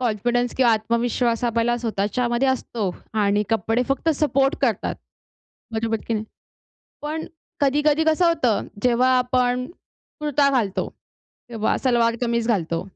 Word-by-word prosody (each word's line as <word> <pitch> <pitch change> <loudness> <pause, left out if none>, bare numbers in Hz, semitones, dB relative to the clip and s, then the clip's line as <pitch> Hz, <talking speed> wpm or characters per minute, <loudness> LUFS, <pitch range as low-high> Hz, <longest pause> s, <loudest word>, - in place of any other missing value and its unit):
Confidence 245 +1 0
किंवा 245 -3 +4
आत्मविश्वास 235 +1 0
आपल्याला 235 0 +1
स्वतःच्यामध्ये 240 +3 0
असतो 230 -6 -1 0.3
आणि 205 +1 +2
कपडे 225 +2 +1
फक्त 275 +4 0
सपोर्ट 275 0 +1
करतात. - - 0 0.8
बरोबर 225 0 -1
की 230 - -1
नाही? 215 0 -2 0.8
पण 310 +2 -4 0.3
कधी-कधी 295 +2 +2
कसं 320 +3 +3
होतं, 260 -10 +1 0.2
जेव्हा 250 +1 +3
आपण 250 0 +1 0.5
कुर्ता 290 -1 +2
घालतो 225 -8 0 0.6
किंवा 225 -2 0
सलवार 235 -2 +2
कमीज 235 -1 0
घालतो, 170 -6 0
240 Hz, 120 wpm, -22 LUFS, 225-265 Hz, 0.8 s, किंवा